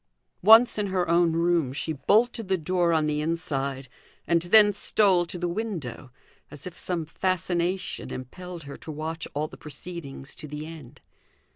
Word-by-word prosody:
Once 225 Hz, +3 st, +7 dB
in 205 Hz, -, 0 dB
her 185 Hz, -2 st, 0 dB
own 170 Hz, 0 st, +3 dB
room 170 Hz, -4 st, +1 dB
she 155 Hz, +3 st, -2 dB
bolted 220 Hz, -, +2 dB
the 190 Hz, 0 st, +1 dB
door 175 Hz, +1 st, +1 dB
on 160 Hz, -2 st, +2 dB
the 150 Hz, 0 st, 0 dB
inside, 140 Hz, -5 st, -2 dB, 0.4 s
and 170 Hz, -1 st, +2 dB
then 205 Hz, +4 st, +6 dB
stole 190 Hz, -3 st, +3 dB
to 180 Hz, -, -6 dB
the 175 Hz, 0 st, -2 dB
window, 170 Hz, -, -4 dB, 0.4 s
as 145 Hz, -1 st, -11 dB
if 180 Hz, -, -7 dB
some 175 Hz, -3 st, -3 dB
fascination 180 Hz, +1 st, -1 dB
impelled 175 Hz, +7 st, -8 dB
her 140 Hz, 0 st, -9 dB
to 160 Hz, -, -8 dB
watch 160 Hz, +2 st, -5 dB
all 150 Hz, +2 st, -1 dB
the -, -, -13 dB
proceedings 150 Hz, -2 st, -8 dB
to 150 Hz, -, -9 dB
the 150 Hz, +1 st, -6 dB
end. 150 Hz, -5 st, -11 dB
170 Hz, 165 wpm, -26 LUFS, 150-185 Hz, 0.4 s, Once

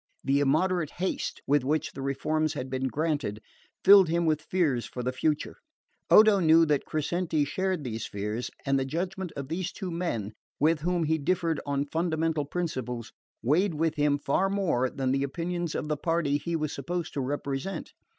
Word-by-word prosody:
The 135 Hz, +1 st, +2 dB
immoderate 155 Hz, +4 st, +2 dB
haste 185 Hz, +2 st, -3 dB
with 145 Hz, -1 st, +3 dB
which 150 Hz, +3 st, 0 dB
the 135 Hz, -, -8 dB
reforms 155 Hz, +3 st, 0 dB
had 130 Hz, -2 st, -5 dB
been 130 Hz, 0 st, -1 dB
granted 145 Hz, -8 st, -1 dB, 0.4 s
filled 195 Hz, -3 st, +8 dB
him 170 Hz, +1 st, +1 dB
with 155 Hz, -1 st, +1 dB
fears 160 Hz, -8 st, 0 dB
for 125 Hz, -, -6 dB
the 125 Hz, -, 0 dB
future. 150 Hz, +3 st, -1 dB, 0.5 s
Odo 215 Hz, -2 st, +7 dB
knew 165 Hz, -1 st, +6 dB
that 150 Hz, -2 st, +1 dB
Crescenti 155 Hz, 0 st, 0 dB
shared 185 Hz, +2 st, -1 dB
these 115 Hz, -3 st, -4 dB
fears, 105 Hz, +4 st, -3 dB, 0.2 s
and 135 Hz, -1 st, +2 dB
the -, -, 0 dB
judgment 180 Hz, +5 st, -3 dB
of 140 Hz, -1 st, -5 dB
these 170 Hz, +4 st, -3 dB
two 190 Hz, -3 st, -5 dB
men, 115 Hz, -, -3 dB, 0.3 s
with 155 Hz, +2 st, +3 dB
whom 175 Hz, +2 st, 0 dB
he 160 Hz, +1 st, +1 dB
differed 165 Hz, 0 st, 0 dB
on 140 Hz, 0 st, 0 dB
fundamental 160 Hz, -1 st, 0 dB
principles, 130 Hz, -8 st, -4 dB, 0.3 s
weighed 165 Hz, -, +2 dB
with 160 Hz, +1 st, +1 dB
him 145 Hz, -1 st, +2 dB
far 145 Hz, +7 st, +1 dB
more 175 Hz, -11 st, +1 dB
than 130 Hz, -1 st, -1 dB
the 135 Hz, +1 st, +1 dB
opinions 170 Hz, +4 st, -3 dB
of -, -, -2 dB
the 150 Hz, -1 st, -1 dB
party 155 Hz, -2 st, 0 dB
he 170 Hz, +2 st, -3 dB
was 155 Hz, -2 st, -2 dB
supposed 170 Hz, +4 st, -4 dB
to 140 Hz, -, -1 dB
represent. 140 Hz, +6 st, -3 dB
155 Hz, 180 wpm, -28 LUFS, 140-170 Hz, 0.5 s, filled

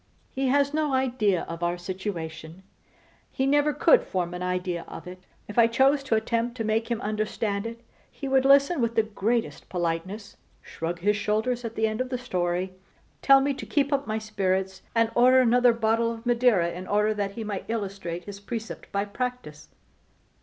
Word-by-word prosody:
He 265 Hz, 0 st, 0 dB
has 280 Hz, +2 st, +2 dB
no 300 Hz, -3 st, +1 dB
idea 240 Hz, -8 st, +1 dB
of 165 Hz, +1 st, -7 dB
our 175 Hz, +1 st, 0 dB
situation; 175 Hz, -2 st, -6 dB, 0.7 s
he 265 Hz, -, -1 dB
never 290 Hz, +2 st, +3 dB
could -, -, +5 dB
form 180 Hz, -2 st, -3 dB
an 180 Hz, -, -5 dB
idea 180 Hz, -1 st, -2 dB
of -, -, -9 dB
it. 185 Hz, +1 st, -11 dB, 0.2 s
If 210 Hz, +3 st, -1 dB
I 230 Hz, -, +7 dB
chose 270 Hz, +5 st, +3 dB
to 235 Hz, -, +2 dB
attempt 230 Hz, +2 st, -1 dB
to 225 Hz, -, -2 dB
make 220 Hz, +2 st, 0 dB
him 235 Hz, -2 st, -1 dB
understand 215 Hz, 0 st, -2 dB
it 230 Hz, 0 st, -8 dB, 0.3 s
he 275 Hz, -, -7 dB
would 265 Hz, -1 st, +3 dB
listen 280 Hz, +3 st, +5 dB
with 230 Hz, 0 st, 0 dB
the 225 Hz, -, +4 dB
greatest 215 Hz, -6 st, -2 dB
politeness, 180 Hz, +4 st, -3 dB, 0.3 s
shrug 170 Hz, +1 st, -5 dB
his 205 Hz, +2 st, +2 dB
shoulders 220 Hz, +4 st, -1 dB
at 230 Hz, -1 st, -5 dB
the 220 Hz, -, +1 dB
end 220 Hz, +2 st, -1 dB
of 255 Hz, -, -3 dB
the 255 Hz, -, -2 dB
story, 185 Hz, -5 st, -2 dB, 0.5 s
tell 275 Hz, -1 st, +6 dB
me 280 Hz, +1 st, +1 dB
to 270 Hz, -, -7 dB
keep 285 Hz, 0 st, +1 dB
up 280 Hz, 0 st, 0 dB
my 215 Hz, 0 st, -1 dB
spirits, 190 Hz, -3 st, -1 dB
and 230 Hz, 0 st, +3 dB
order 255 Hz, +2 st, +6 dB
another 245 Hz, 0 st, +5 dB
bottle 230 Hz, 0 st, +1 dB
of 230 Hz, +1 st, -11 dB
Madeira 235 Hz, -8 st, +3 dB
in 180 Hz, +2 st, -7 dB
order 210 Hz, +1 st, +2 dB
that 200 Hz, -2 st, -3 dB
he 225 Hz, -, -5 dB
might 205 Hz, -3 st, -4 dB
illustrate 195 Hz, -6 st, -4 dB
his 200 Hz, -1 st, -9 dB
precept 225 Hz, +2 st, -7 dB
by 200 Hz, 0 st, 0 dB
practice. 245 Hz, -8 st, -5 dB
220 Hz, 190 wpm, -26 LUFS, 190-250 Hz, 0.7 s, I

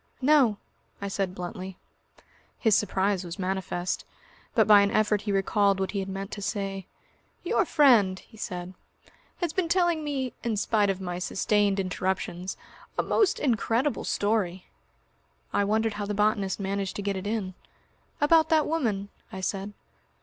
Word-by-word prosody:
"No," 260 Hz, -6 st, +4 dB, 0.4 s
I 200 Hz, -, -4 dB
said 195 Hz, -2 st, -2 dB
bluntly. 185 Hz, +1 st, -6 dB, 0.8 s
His 220 Hz, -4 st, +3 dB
surprise 195 Hz, -2 st, +1 dB
was 175 Hz, +1 st, -7 dB
manifest. 185 Hz, -2 st, -2 dB, 0.5 s
But -, -, +5 dB
by 210 Hz, -1 st, +8 dB
an 200 Hz, -, +3 dB
effort 210 Hz, -1 st, +2 dB
he 205 Hz, -, -2 dB
recalled 195 Hz, 0 st, +2 dB
what 190 Hz, -, -1 dB
he 200 Hz, -, -2 dB
had 195 Hz, 0 st, -4 dB
meant 195 Hz, +1 st, -5 dB
to 205 Hz, -, -6 dB
say. 195 Hz, -2 st, -3 dB, 0.6 s
"Your 415 Hz, -, +2 dB
friend," 235 Hz, -, +5 dB
he 220 Hz, -, -16 dB
said, 180 Hz, -3 st, -5 dB, 0.7 s
"has 340 Hz, -3 st, -1 dB
been 360 Hz, -3 st, 0 dB
telling 345 Hz, -3 st, +2 dB
me, 270 Hz, -4 st, -2 dB
in 225 Hz, -3 st, -1 dB
spite 205 Hz, 0 st, +2 dB
of 195 Hz, -1 st, -1 dB
my 180 Hz, -1 st, -4 dB
sustained 200 Hz, +2 st, +1 dB
interruptions, 185 Hz, -1 st, -2 dB, 0.4 s
a -, -, +2 dB
most 420 Hz, -4 st, +2 dB
incredible 245 Hz, +1 st, +1 dB
story." 200 Hz, -4 st, 0 dB, 0.9 s
I 205 Hz, -, +3 dB
wondered 220 Hz, +2 st, +1 dB
how 205 Hz, 0 st, -4 dB
the 205 Hz, -, -2 dB
botanist 210 Hz, -2 st, +1 dB
managed 195 Hz, 0 st, -2 dB
to 205 Hz, -, -4 dB
get 200 Hz, 0 st, -1 dB
it 190 Hz, +1 st, -4 dB
in. 205 Hz, -4 st, -2 dB, 0.7 s
"About 320 Hz, +2 st, +4 dB
that 315 Hz, -2 st, +4 dB
woman?" 220 Hz, -11 st, -1 dB, 0.2 s
I 190 Hz, -, -6 dB
said. 195 Hz, +2 st, -2 dB
200 Hz, 155 wpm, -27 LUFS, 190-225 Hz, 0.9 s, by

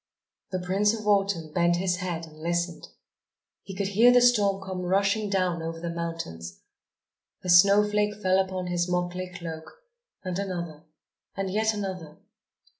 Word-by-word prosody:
The 185 Hz, -, -2 dB
Prince 195 Hz, +4 st, +1 dB
of 215 Hz, -, -9 dB
Autumn 195 Hz, -6 st, +1 dB
bent 175 Hz, -1 st, +3 dB
his 180 Hz, 0 st, 0 dB
head 175 Hz, -3 st, -4 dB
and 155 Hz, -1 st, -16 dB
listened. 170 Hz, +1 st, -2 dB, 0.7 s
He 195 Hz, -, -9 dB
could 195 Hz, 0 st, -2 dB
hear 225 Hz, +5 st, +6 dB
the 245 Hz, -, +6 dB
storm 210 Hz, -6 st, +3 dB
come 185 Hz, -1 st, -4 dB
rushing 200 Hz, +3 st, +1 dB
down 185 Hz, -4 st, 0 dB
over 165 Hz, 0 st, -5 dB
the 170 Hz, 0 st, -4 dB
mountains. 165 Hz, -, -6 dB, 0.8 s
A 185 Hz, -, -4 dB
snowflake 210 Hz, +3 st, +5 dB
fell 190 Hz, -2 st, +2 dB
upon 185 Hz, -1 st, -2 dB
his 175 Hz, 0 st, -1 dB
motley 180 Hz, +1 st, -2 dB
cloak... 170 Hz, -, -9 dB, 0.4 s
and 185 Hz, -1 st, -3 dB
another... 170 Hz, -5 st, -5 dB, 0.5 s
and 195 Hz, -1 st, -2 dB
yet 220 Hz, +2 st, +1 dB
another.... 185 Hz, -7 st, -6 dB
185 Hz, 150 wpm, -26 LUFS, 170-200 Hz, 0.8 s, hear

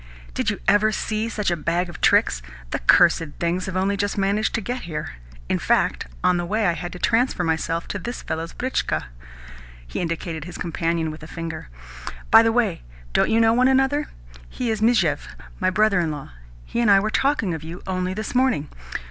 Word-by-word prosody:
"Did -, -, 0 dB
you -, -, -2 dB
ever 205 Hz, +3 st, +4 dB
see 215 Hz, +1 st, -2 dB
such 210 Hz, -5 st, -1 dB
a -, -, +2 dB
bag 170 Hz, +3 st, -1 dB
of 175 Hz, -2 st, -10 dB
tricks? -, -, +3 dB, 0.3 s
The -, -, -1 dB
cursed 170 Hz, -, +5 dB, 0.2 s
things 175 Hz, +2 st, -1 dB
have 185 Hz, -1 st, -3 dB
only 195 Hz, +2 st, +1 dB
just 205 Hz, +1 st, -1 dB
managed 200 Hz, +2 st, +1 dB
to -, -, +1 dB
get 245 Hz, +5 st, -4 dB
here. 150 Hz, -, -5 dB, 0.3 s
In -, -, 0 dB
fact, -, -, +1 dB, 0.2 s
on 180 Hz, -, +4 dB
the 175 Hz, -, -1 dB
way 215 Hz, +4 st, 0 dB
I 175 Hz, -, +4 dB
had 175 Hz, +2 st, -5 dB
to -, -, -7 dB
transfer 230 Hz, -1 st, +1 dB
myself 165 Hz, 0 st, -1 dB
to 200 Hz, -, -3 dB
this 240 Hz, +6 st, -6 dB
fellow's 165 Hz, +1 st, -4 dB
britchka." 260 Hz, +1 st, -1 dB, 0.8 s
He -, -, -5 dB
indicated 165 Hz, -2 st, -3 dB
his 175 Hz, -, -8 dB
companion 165 Hz, -1 st, -1 dB
with 155 Hz, -, -10 dB
a 155 Hz, -, -9 dB
finger. 165 Hz, -, -6 dB, 0.6 s
"By 225 Hz, -, +10 dB
the 225 Hz, 0 st, +3 dB
way, 225 Hz, -7 st, +1 dB, 0.3 s
don't -, -, +3 dB
you 225 Hz, -, +3 dB
know 225 Hz, 0 st, +5 dB
one 250 Hz, +2 st, +4 dB
another? 270 Hz, +3 st, +2 dB, 0.4 s
He 245 Hz, -2 st, -2 dB
is 215 Hz, -1 st, -2 dB
Mizhuev, 190 Hz, -11 st, +2 dB, 0.3 s
my -, -, +2 dB
brother 205 Hz, 0 st, +3 dB
in 170 Hz, -2 st, 0 dB
law. 145 Hz, -, -6 dB, 0.3 s
He -, -, -3 dB
and 230 Hz, -, +3 dB
I 200 Hz, -1 st, +7 dB
were 215 Hz, +2 st, -1 dB
talking 270 Hz, -, +1 dB
of 160 Hz, -1 st, -5 dB
you 165 Hz, +3 st, -8 dB
only 185 Hz, 0 st, -2 dB
this 215 Hz, +1 st, -4 dB
morning. 250 Hz, -, +1 dB
185 Hz, 205 wpm, -23 LUFS, 165-225 Hz, 0.8 s, By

